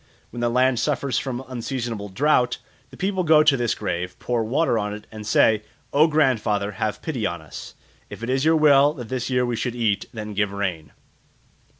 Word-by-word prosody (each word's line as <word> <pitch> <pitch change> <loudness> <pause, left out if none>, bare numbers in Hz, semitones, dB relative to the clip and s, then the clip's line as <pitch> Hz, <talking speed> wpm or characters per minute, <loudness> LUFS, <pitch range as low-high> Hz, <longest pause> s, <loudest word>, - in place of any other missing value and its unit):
When 120 - -7
the 120 0 +1
land 125 0 +2
suffers 140 -3 0
from 130 -1 -5
unseasonable 120 -4 -4
drought, 125 +4 +2 0.3
the - - -14
people 190 -1 -1
go 155 -2 +6
to 150 -2 +5
this 120 -3 0
grave, 90 -3 -4
pour 120 -2 -1
water 120 +1 +1
on 105 0 -3
it, 105 - -11
and 105 -1 -8
say, 110 0 +4 0.3
"O 150 +3 +5
grandfather, 115 -9 +1
have 105 +1 -3
pity 130 -9 -2
on 85 - -5
us; 80 -1 -10 0.3
if - - -9
it 115 - -3
is 130 +1 +1
your 160 +1 +4
will 145 -2 +5
that 120 -6 -8
this 130 -1 -3
year 125 -1 +1
we 120 -1 -2
should 120 +1 -3
eat, 110 -4 0
then 105 -3 -6
give 105 0 0
rain." 90 -6 -3
120 Hz, 200 wpm, -23 LUFS, 105-135 Hz, 0.3 s, go